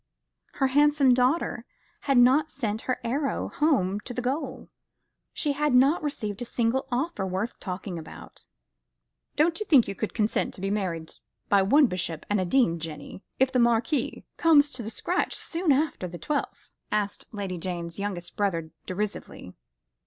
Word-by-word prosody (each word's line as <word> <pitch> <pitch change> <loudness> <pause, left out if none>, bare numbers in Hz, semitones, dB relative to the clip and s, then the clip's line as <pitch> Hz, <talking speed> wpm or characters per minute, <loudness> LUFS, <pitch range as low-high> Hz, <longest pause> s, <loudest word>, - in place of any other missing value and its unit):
Her 270 - +1
handsome 290 -1 +4
daughter 255 +7 +1 0.5
had 275 - +4
not 265 +5 +5
sent 220 -7 -3
her 255 - 0
arrow 275 +4 -1
home 210 - +1
to 245 +3 -8
the 250 - -1
gold. 270 +6 -3 0.6
She 295 -2 0
had 295 -2 +1
not 275 +6 +5
received 215 -8 -4
a - - 0
single 240 +3 0
offer 260 - -1
worth 190 +5 -3
talking 185 -2 -5
about. 160 - -11 0.9
"Don't 325 +3 +2
you 425 - -3
think 270 -7 +6
you 200 - -3
could 215 +2 -4
consent 215 -1 0
to - - -10
be 195 0 -1
married 170 -6 -2 0.4
by 200 -1 +5
one 280 +10 +5
bishop 175 - -3
and 205 -2 +2
a - - -1
dean, 175 -5 +2
Jenny, 160 +3 -7 0.2
if 260 0 +3
the 255 - +2
Marquis 235 +3 +1
comes 300 -3 +5
to 255 - -5
the 220 - -5
scratch 345 - -1
soon 335 -2 -1
after 280 -9 +1
the 175 0 -8
twelfth?" 290 - -4 0.2
asked 205 -1 -1
Lady 195 -4 -4
Jane's 170 0 -5
youngest 180 -4 -4
brother 165 -6 -1 0.2
derisively. 185 - -5
230 Hz, 165 wpm, -26 LUFS, 190-280 Hz, 0.9 s, think